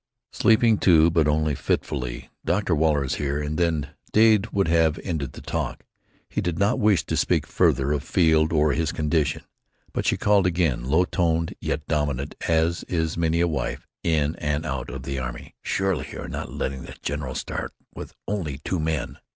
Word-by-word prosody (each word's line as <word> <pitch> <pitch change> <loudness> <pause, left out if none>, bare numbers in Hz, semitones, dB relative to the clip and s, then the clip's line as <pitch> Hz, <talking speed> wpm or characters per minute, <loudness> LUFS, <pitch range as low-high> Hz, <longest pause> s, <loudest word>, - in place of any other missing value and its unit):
"Sleeping, 110 -1 +4
too, 85 -2 +5
but 80 -2 +3
only 75 0 +1
fitfully. 60 -3 -3
Dr. 90 -1 +1
Waller 75 -2 +2
is 65 - -2
here," 70 0 -1
and 75 +1 -3
then 80 -5 +1 0.2
Dade 110 -1 +5
would 100 -4 0
have 80 -1 +3
ended 80 -8 -3
the - - -10
talk. - - -3 0.4
He - - -2
did 85 -2 -2
not 100 +3 +2
wish 105 -4 +3
to - - -2
speak - - +1
further 65 +2 +2
of 75 -2 0
Field 80 -3 +3
or 75 -2 +3
his 80 -1 0
condition. 75 -1 0 0.5
But - - -1
she - - +2
called 100 -3 +3
again, 85 -9 0
low 80 +7 +3
toned, 85 -2 0
yet 75 - -2
dominant, 75 -3 -1 0.2
as 80 +1 +2
is 80 -3 -1
many 85 0 +1
a 85 - +3
wife 75 -3 -3 0.2
in 80 -2 +1
and 75 +1 -1
out 65 -5 -3
of 65 +1 -6
the 70 0 -3
army. - - -6
"Surely 95 -5 -1
you - - -6
are - - -6
not - - -5
letting 65 -1 -3
the - - -9
general 70 -2 -3
start - - -4 0.2
with - - -9
only 85 -10 -2
two 85 +5 -3
men!" 80 -3 -2
80 Hz, 185 wpm, -24 LUFS, 75-85 Hz, 0.5 s, too